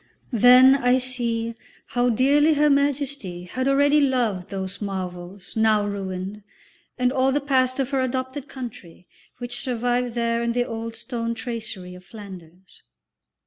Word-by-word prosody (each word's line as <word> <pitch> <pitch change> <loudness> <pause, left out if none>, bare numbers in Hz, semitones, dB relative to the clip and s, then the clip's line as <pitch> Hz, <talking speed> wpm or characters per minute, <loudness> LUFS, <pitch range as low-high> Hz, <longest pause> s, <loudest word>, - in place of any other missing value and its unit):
Then 250 +3 +7
I 250 -2 +3
see 235 -3 +1 0.4
how 245 0 +1
dearly 285 +6 +3
Her 295 0 +3
Majesty 280 -10 0
had 255 +8 -3
already 285 +2 +4
loved 235 -9 0
those 190 0 -5
marvels 185 -1 -6
now 220 -2 +3
ruined, 195 0 -5 0.6
and 250 0 +1
all 265 0 +2
the 290 - +1
past 260 -2 +1
of 270 0 -1
her 270 -1 +1
adopted 260 +2 -3
country, 235 -9 -9 0.3
which 245 0 -4
survived 245 -1 -1
there 235 0 0
in 235 0 -1
the 245 0 +1
old 230 0 -6
stone 230 -1 -4
tracery 220 -6 -6
of 180 0 -13
Flanders. 185 -3 -13
240 Hz, 145 wpm, -23 LUFS, 200-260 Hz, 0.6 s, Then